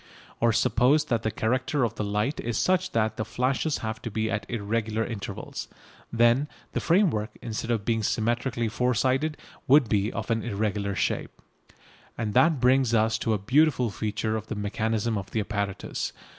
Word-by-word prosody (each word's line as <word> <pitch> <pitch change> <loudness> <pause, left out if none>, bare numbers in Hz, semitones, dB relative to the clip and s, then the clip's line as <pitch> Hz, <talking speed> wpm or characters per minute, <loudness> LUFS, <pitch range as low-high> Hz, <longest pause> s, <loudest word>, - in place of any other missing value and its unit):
Or 115 0 +4
suppose 125 +6 +3
that 115 -2 0
the 110 - 0
character 130 +6 0
of 115 -2 0
the 105 - -3
light 105 +7 -1
is 120 -1 -2
such 185 0 +2
that 110 -1 +1
the - - -1
flashes 130 +6 0
have 110 +2 -4
to 115 - -4
be 110 +1 -1
at 105 - -3
irregular 110 0 -1
intervals. 110 -5 -6 0.4
Then 120 +4 +3 0.3
the - - 0
framework, 165 - +1
instead 115 0 -5
of 110 -4 0
being 115 -1 +1
symmetrically 120 +2 0
four 125 +3 0
sided, 135 +6 +1 0.3
would 135 -2 +6
be 105 +1 +1
of 115 +1 -4
an 115 -1 +1
irregular 100 -2 -2
shape. - - -2 0.8
And 110 -3 -2
that 160 +1 +4
brings 125 -1 +3
us 110 0 +2
to 115 - 0
a - - 0
beautiful 125 +2 +2
feature 110 +1 -2
of 110 0 -4
the 110 - -4
mechanism 110 +1 -1
of 95 0 -8
the 110 - -1
apparatus. 100 -2 -3
115 Hz, 175 wpm, -26 LUFS, 110-125 Hz, 0.8 s, would